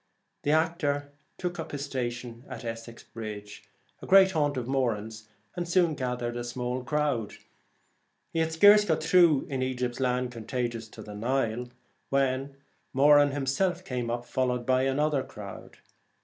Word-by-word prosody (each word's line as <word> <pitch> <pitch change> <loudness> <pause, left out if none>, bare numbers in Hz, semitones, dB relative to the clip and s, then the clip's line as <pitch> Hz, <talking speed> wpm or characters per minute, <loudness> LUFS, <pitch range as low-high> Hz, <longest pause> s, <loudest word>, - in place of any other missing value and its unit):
The - - -2
actor 150 -3 +1 0.3
took 180 -1 -4
up 160 - -6
his 145 0 -3
station 120 -3 -4
at 125 -2 -7
Essex 115 0 -7
Bridge, 105 -2 -8 0.4
a - - -9
great 190 0 +7
haunt 145 -5 0
of 120 -2 -3
Moran's, 110 -5 -2 0.3
and 175 -1 -3
soon 175 -2 +3
gathered 125 -3 -3
a 120 - -3
small 125 +1 -3
crowd. 140 -5 -1 1.0
He 165 - 0
had 160 0 +1
scarce 205 +6 +7
got 160 -6 0
through 165 -4 +5
' - - -16
In 135 -1 -1
Egypt's 125 -1 -2
land, 125 -1 0
contagious 120 -1 -4
to - - -11
the 105 - -9
Nile,' 120 +1 -1 0.4
when 135 0 0 0.4
Moran 145 +1 +6
himself 145 +7 -1
came 125 -2 -3
up, 120 +1 -3
followed 125 -1 -1
by 130 0 +3
another 145 +1 +1
crowd. 100 -6 -10
130 Hz, 155 wpm, -28 LUFS, 120-150 Hz, 1.0 s, great